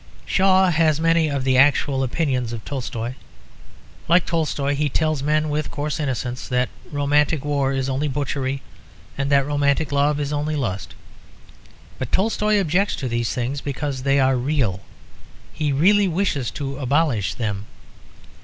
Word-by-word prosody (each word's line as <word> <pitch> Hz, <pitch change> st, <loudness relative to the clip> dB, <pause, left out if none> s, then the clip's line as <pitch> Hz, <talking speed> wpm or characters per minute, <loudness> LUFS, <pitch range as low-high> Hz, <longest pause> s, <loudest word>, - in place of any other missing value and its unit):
Shaw 190 Hz, -1 st, +4 dB
has 155 Hz, -2 st, +2 dB
many 165 Hz, -1 st, +3 dB
of 140 Hz, -2 st, -2 dB
the 130 Hz, -1 st, +3 dB
actual 140 Hz, -1 st, +3 dB
opinions 130 Hz, -3 st, -1 dB
of 110 Hz, -2 st, -7 dB
Tolstoy. 120 Hz, -3 st, -4 dB, 0.9 s
Like 175 Hz, +1 st, +4 dB
Tolstoy 150 Hz, -4 st, -1 dB
he 145 Hz, +1 st, 0 dB
tells 155 Hz, 0 st, 0 dB
men, 155 Hz, +2 st, +1 dB
with 150 Hz, +1 st, -2 dB
coarse 150 Hz, +1 st, -3 dB
innocence, 125 Hz, -3 st, -3 dB
that 125 Hz, 0 st, 0 dB, 0.2 s
romantic 145 Hz, 0 st, +1 dB
war 140 Hz, -2 st, +1 dB
is 135 Hz, -1 st, -1 dB
only 135 Hz, +3 st, -1 dB
butchery 135 Hz, -1 st, -2 dB, 0.5 s
and 140 Hz, 0 st, -2 dB
that 140 Hz, -1 st, +4 dB
romantic 145 Hz, +1 st, +1 dB
love 145 Hz, +1 st, +2 dB
is 145 Hz, 0 st, -2 dB
only 150 Hz, +1 st, -1 dB
lust. 100 Hz, -9 st, -3 dB, 1.0 s
But 130 Hz, -, -4 dB
Tolstoy 210 Hz, +1 st, +2 dB
objects 190 Hz, +3 st, +1 dB
to 130 Hz, -, -4 dB
these 120 Hz, -1 st, -1 dB
things 130 Hz, +3 st, -2 dB
because 140 Hz, -1 st, -3 dB
they 140 Hz, +1 st, +2 dB
are 130 Hz, -1 st, +3 dB
real; 125 Hz, -7 st, 0 dB, 0.7 s
he 150 Hz, -2 st, -1 dB
really 195 Hz, +8 st, +4 dB
wishes 165 Hz, -, -1 dB
to 140 Hz, -1 st, -4 dB
abolish 135 Hz, -, +1 dB
them. 105 Hz, -3 st, -3 dB
140 Hz, 150 wpm, -22 LUFS, 130-155 Hz, 1.0 s, Shaw